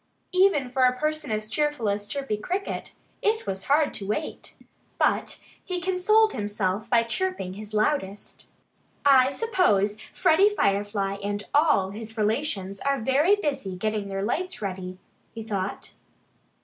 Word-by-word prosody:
Even 365 Hz, -9 st, +3 dB
for 260 Hz, 0 st, +2 dB
a 250 Hz, 0 st, +2 dB
person 305 Hz, +1 st, -2 dB
as 215 Hz, 0 st, -2 dB
cheerful 295 Hz, -2 st, 0 dB
as 205 Hz, 0 st, -1 dB
Chirpy 275 Hz, -4 st, -2 dB
Cricket, 365 Hz, -, -4 dB, 0.3 s
it 440 Hz, +1 st, +1 dB
was 190 Hz, -1 st, -4 dB
hard 290 Hz, +2 st, +3 dB
to 195 Hz, -, -6 dB
wait. 300 Hz, +10 st, -4 dB, 0.4 s
But -, -, +1 dB, 0.2 s
he 365 Hz, -1 st, -3 dB
consoled 380 Hz, +5 st, +3 dB
himself 205 Hz, 0 st, -2 dB
by 235 Hz, -1 st, +4 dB
chirping 235 Hz, -, -2 dB
his 210 Hz, +1 st, -9 dB
loudest. 210 Hz, -2 st, -2 dB, 0.6 s
"I 265 Hz, -2 st, +6 dB
suppose 270 Hz, -, +1 dB
Freddie 390 Hz, +6 st, +4 dB
Firefly 200 Hz, -, 0 dB
and 205 Hz, 0 st, -2 dB
all 290 Hz, -11 st, +3 dB
his 220 Hz, +2 st, -8 dB
relations 210 Hz, -3 st, -1 dB
are 275 Hz, 0 st, 0 dB
very 280 Hz, -, +3 dB
busy 275 Hz, -, -3 dB
getting 215 Hz, +1 st, -2 dB
their 195 Hz, 0 st, -3 dB
lights 360 Hz, -, -2 dB
ready," 185 Hz, -2 st, -5 dB, 0.4 s
he 225 Hz, -, -5 dB
thought. 200 Hz, -3 st, -4 dB
225 Hz, 140 wpm, -26 LUFS, 205-305 Hz, 0.6 s, I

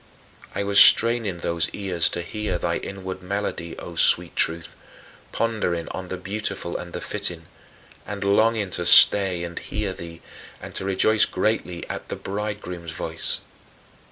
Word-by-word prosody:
I -, -, -1 dB
was 100 Hz, 0 st, +3 dB
straining 115 Hz, -5 st, +6 dB
those 85 Hz, -1 st, -1 dB
ears 95 Hz, -4 st, 0 dB
to 85 Hz, -, -4 dB
hear 105 Hz, 0 st, -3 dB
thy -, -, -2 dB
inward 95 Hz, -1 st, -7 dB
melody, 90 Hz, -3 st, -4 dB
O 85 Hz, -, -9 dB
sweet -, -, +2 dB
Truth, 80 Hz, 0 st, -1 dB, 0.6 s
pondering 105 Hz, -8 st, -2 dB
on 95 Hz, -1 st, -6 dB
"the 95 Hz, -, -5 dB
beautiful 100 Hz, -1 st, -5 dB
and 85 Hz, -, -6 dB
the -, -, -5 dB
fitting" 85 Hz, -2 st, -2 dB, 0.6 s
and 100 Hz, 0 st, -5 dB
longing 105 Hz, 0 st, +2 dB
to 85 Hz, -, 0 dB
stay 95 Hz, -3 st, +7 dB
and 85 Hz, 0 st, -6 dB
hear 105 Hz, -3 st, -4 dB
thee, 85 Hz, -2 st, -10 dB, 0.4 s
and -, -, -10 dB
to -, -, -3 dB
rejoice 100 Hz, +3 st, +3 dB
greatly 95 Hz, -3 st, -2 dB
at -, -, -7 dB
"the -, -, -3 dB
Bridegroom's 95 Hz, -5 st, -6 dB
voice." 80 Hz, 0 st, -2 dB
95 Hz, 150 wpm, -23 LUFS, 85-105 Hz, 0.6 s, stay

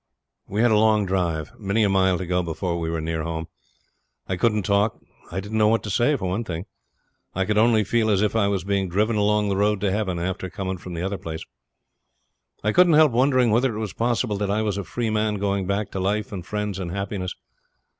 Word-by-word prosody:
We 105 Hz, +4 st, 0 dB
had 120 Hz, -, +4 dB
a 105 Hz, -, +5 dB
long 110 Hz, -1 st, +3 dB
drive 85 Hz, -5 st, -1 dB
many 105 Hz, +1 st, +1 dB
a -, -, +4 dB
mile 95 Hz, -1 st, +3 dB
to 95 Hz, -, -4 dB
go 90 Hz, +1 st, +1 dB
before 85 Hz, +1 st, -3 dB
we 80 Hz, -1 st, -2 dB
were 80 Hz, -1 st, -2 dB
near 80 Hz, 0 st, -2 dB
home. 80 Hz, 0 st, -4 dB, 0.8 s
I 95 Hz, -, -1 dB
couldn't 105 Hz, +1 st, +1 dB
talk; 100 Hz, +2 st, +1 dB, 0.3 s
I 90 Hz, -, -2 dB
didn't 105 Hz, +3 st, -3 dB
know 105 Hz, -, +5 dB
what 115 Hz, +1 st, +2 dB
to 105 Hz, -, -4 dB
say, 120 Hz, +9 st, +3 dB
for 95 Hz, -8 st, -3 dB
one 100 Hz, +6 st, -1 dB
thing. 85 Hz, -4 st, -5 dB, 0.7 s
I 95 Hz, +1 st, +1 dB
could 105 Hz, +2 st, +1 dB
only 110 Hz, -1 st, +4 dB
feel 110 Hz, +2 st, +1 dB
as 100 Hz, -1 st, +3 dB
if 105 Hz, -, 0 dB
I 105 Hz, -3 st, +3 dB
was 100 Hz, -3 st, -1 dB
being 100 Hz, -1 st, 0 dB
driven 105 Hz, +5 st, +1 dB
along 105 Hz, 0 st, +2 dB
the 95 Hz, -, 0 dB
road 105 Hz, 0 st, +2 dB
to 100 Hz, -2 st, +1 dB
heaven 95 Hz, -3 st, -1 dB
after 95 Hz, +2 st, -3 dB
coming 95 Hz, 0 st, -4 dB
from 90 Hz, -1 st, -8 dB
the 85 Hz, -, -3 dB
other 95 Hz, +1 st, -2 dB
place. 80 Hz, 0 st, -6 dB, 1.2 s
I 110 Hz, -, +2 dB
couldn't 175 Hz, +2 st, +5 dB
help 155 Hz, -2 st, +6 dB
wondering 130 Hz, -1 st, +3 dB
whether 120 Hz, +1 st, +2 dB
it -, -, -4 dB
was 110 Hz, -3 st, -4 dB
possible 120 Hz, -2 st, 0 dB
that 100 Hz, 0 st, -2 dB
I 105 Hz, +2 st, +1 dB
was 105 Hz, -2 st, -1 dB
a -, -, -3 dB
free 115 Hz, +4 st, -3 dB
man 110 Hz, 0 st, +1 dB
going 100 Hz, -1 st, -1 dB
back 100 Hz, +1 st, -1 dB
to 95 Hz, -, -4 dB
life 100 Hz, +3 st, -1 dB
and 95 Hz, -4 st, -5 dB
friends 105 Hz, 0 st, -3 dB
and 90 Hz, -3 st, -4 dB
happiness. 100 Hz, 0 st, -4 dB
100 Hz, 235 wpm, -24 LUFS, 95-110 Hz, 1.2 s, help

